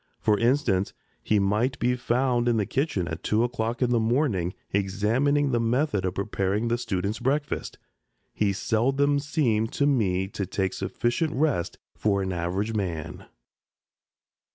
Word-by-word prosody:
For 105 -1 +2
instance, 115 -6 +1 0.3
he 110 - +1
might 105 +6 +1
be 125 +1 +1
found 125 0 +1
in 120 -1 +3
the 105 - +1
kitchen 130 - -1
at 80 -1 -5
two 110 +2 +1
o'clock 120 0 -1
in 125 - +1
the 120 - +3
morning 110 - +1 0.2
examining 115 +9 +1
the 120 - +2
method 115 -3 +1
of 90 - -2
preparing 100 +2 -1
the 120 +1 0
students' 100 -1 -2
breakfast. 145 +4 -1 0.6
He 105 -2 +1
seldom 135 +8 +1
seemed 125 -7 0
to 140 - +1
me 95 -9 +1
to 100 -1 -4
take 95 0 -1
sufficient 120 +7 -1
rest 135 - 0 0.2
for 100 -2 +1
an 95 -1 -2
average 90 +6 -2
man. 90 -8 -4
115 Hz, 150 wpm, -26 LUFS, 100-130 Hz, 0.6 s, in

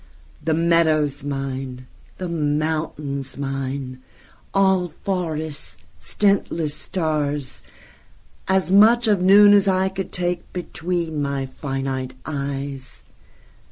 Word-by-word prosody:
The 160 0 +1
meadows 160 -3 +2
mine, 135 -2 -4 0.3
the 185 - -4
mountains 150 -3 -2
mine,—All 140 +7 -2
forests, 160 - -3 0.2
stintless 185 -7 0
stars, 150 -4 -2 0.9
As 190 -1 +1
much 225 +4 +6
of 205 -4 +3
noon 205 +2 +8
as 200 -1 +5
I 190 0 +2
could 190 -1 -5
takeBetween 175 -2 -3
my 140 -1 -1
finite 135 -1 -4
eyes. 140 -2 -5
155 Hz, 90 wpm, -22 LUFS, 140-180 Hz, 0.9 s, noon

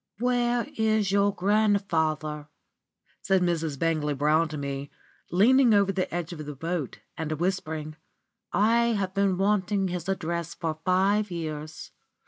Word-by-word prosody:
"Where 240 0 +1
is 220 -3 +2
your 200 0 +3
grandfather?" 175 -7 0 0.7
said 190 -1 +2
Mrs. 165 -4 -1
Bangley 155 -2 0
Brown 155 +4 +2
to 155 0 -6
me, 140 0 -4 0.4
leaning 235 +5 +5
over 200 -1 +3
the 190 -1 -2
edge 175 0 -3
of 155 -2 -7
the 145 -1 -7
boat 165 -1 -4
and 160 -2 -4
whispering. 155 -3 -3 0.6
"I 235 +3 +3
have 195 -3 -2
been 195 -2 +1
wanting 195 0 +1
his 175 0 -4
address 170 -3 -3
for 160 -2 -3
five 195 +3 +2
years. 155 -3 -6
180 Hz, 135 wpm, -27 LUFS, 155-200 Hz, 0.7 s, leaning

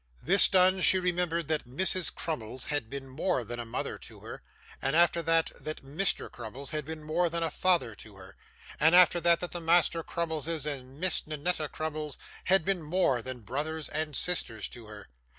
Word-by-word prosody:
This 195 +5 +7
done, 185 0 +4
she 190 - +6
remembered 175 -3 -1
that 155 -5 -1
Mrs. 185 +7 0
Crummles 130 -5 -4
had 145 -7 -2
been 135 0 -6
more 130 +1 -1
than 120 +2 -7
a 120 - -6
mother - - -4
to - - -11
her, - - -9 0.4
and 135 +3 0
after 170 0 +4
that, 165 0 +2
that 155 -2 -6
Mr. 160 +9 0
Crummles 125 +4 -6
had 150 -2 -3
been 160 0 -7
more 170 +3 0
than 170 0 -2
a 165 - -1
father 175 -9 +1
to 105 -1 -12
her, 95 0 -14 0.4
and 160 +3 +5
after 180 -1 +6
that, 170 0 +4
that 180 - -3
the 175 - -4
Master 165 0 +3
Crummleses 160 -2 -2
and 135 -2 -6
Miss 185 -3 +1
Ninetta 155 0 -2
Crummles 155 -2 -4 0.3
had 190 -3 +3
been 195 -3 0
more 155 -6 +1
than 130 0 -6
brothers 150 +8 -3
and 150 -1 -2
sisters 115 - -1
to 115 -3 -10
her. 105 -1 -11
155 Hz, 190 wpm, -29 LUFS, 135-175 Hz, 0.4 s, This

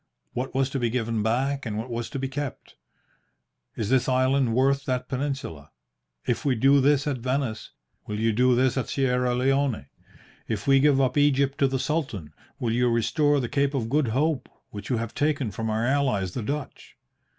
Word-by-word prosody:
What 130 +2 -4
was 135 0 +1
to 135 - -2
be 120 -2 +1
given 115 -2 -1
back, 130 +5 0
and 110 -3 -4
what 115 +3 -5
was 115 0 -3
to - - -5
be 135 0 -2
kept? 140 0 -6 1.0
Is 110 -2 -3
this 130 0 +2
island 130 -2 +2
worth 135 +2 +2
that 125 -1 -2
peninsula? 130 - -4 0.6
If 125 - -1
we 140 -4 +2
do 135 +4 +4
this 145 +1 +3
at 140 -4 -1
Venice, 125 -3 -2 0.4
will 105 0 -3
you 115 +1 +2
do 125 +2 +3
that 130 +1 +2
at 130 - -2
Sierra 125 -2 +1
Leone? 135 - +1 0.6
If 105 -3 -3
we 135 -1 +5
give 140 -1 +4
up 130 +1 +2
Egypt 140 -1 +2
to 140 - +4
the 135 0 -1
Sultan, 130 - -3 0.2
will 120 -2 -1
you 125 +1 +2
restore 145 +6 +2
the 125 - -2
Cape 140 +1 0
of 115 -4 -2
Good 150 -2 +2
Hope, 140 +5 0 0.2
which 105 -1 -8
you 125 - +1
have 115 0 -4
taken 145 -6 0
from 110 +4 -3
our 110 +2 0
allies 125 -9 +1
the 125 - -3
Dutch? 140 +5 -6
130 Hz, 195 wpm, -25 LUFS, 115-140 Hz, 1.0 s, we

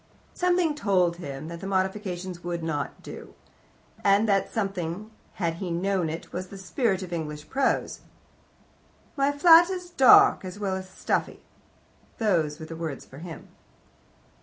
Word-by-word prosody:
" - - -33
Something 355 -3 +2
told 185 -10 +1
him 140 -3 -7
that 170 0 -7
the 195 - -6
modifications 190 -2 -2
would 170 -1 -3
not 145 -4 -3
do; - - -10 0.7
and 200 +2 +4
that 195 -2 +1
something, 195 -1 -3 0.2
had 170 -3 -2
he 185 0 -4
known 180 0 0
it, 165 +2 -7
was 185 +1 -4
the 195 - -10
spirit 195 0 -1
of 180 -1 -7
English 150 -2 -5
Prose. 270 -1 0 1.2
"My 280 0 +2
flat 330 +4 +7
is 360 -2 -5
dark 265 -10 +7
as 185 +1 -7
well 195 -2 -2
as 190 0 -6
stuffy." - - -2 0.7
Those 165 -9 +1
were 160 - -7
the 165 - -8
words 160 -4 -5
for 135 - -13
him. 165 -3 -9
185 Hz, 155 wpm, -26 LUFS, 170-215 Hz, 1.2 s, flat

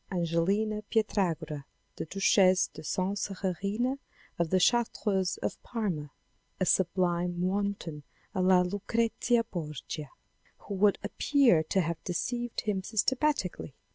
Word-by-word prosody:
Angelina 190 +5 0
Pietragrua 165 -9 0 0.3
(the - - -4
Duchesse 190 +1 +4
de - - -9
Sansererina 200 - -2 0.4
of 170 -2 +1
the 185 - +3
Chartreuse 205 -3 +1
of - - -3
Parma), 185 -11 -3 0.3
" - - -43
a 185 - +2
sublime 175 -1 +1
wanton 190 -5 -2 0.3
a 185 - 0
la 185 0 +5
Lucrezia 230 +5 +1
Borgia 150 - -6 0.3
" - - -36
who - - -4
would 200 +1 +3
appear 235 - +3
to 190 +4 +1
have 170 -1 -3
deceived 240 +7 -2
him 205 -3 -1
systematically. 220 - 0
190 Hz, 120 wpm, -30 LUFS, 175-215 Hz, 0.4 s, la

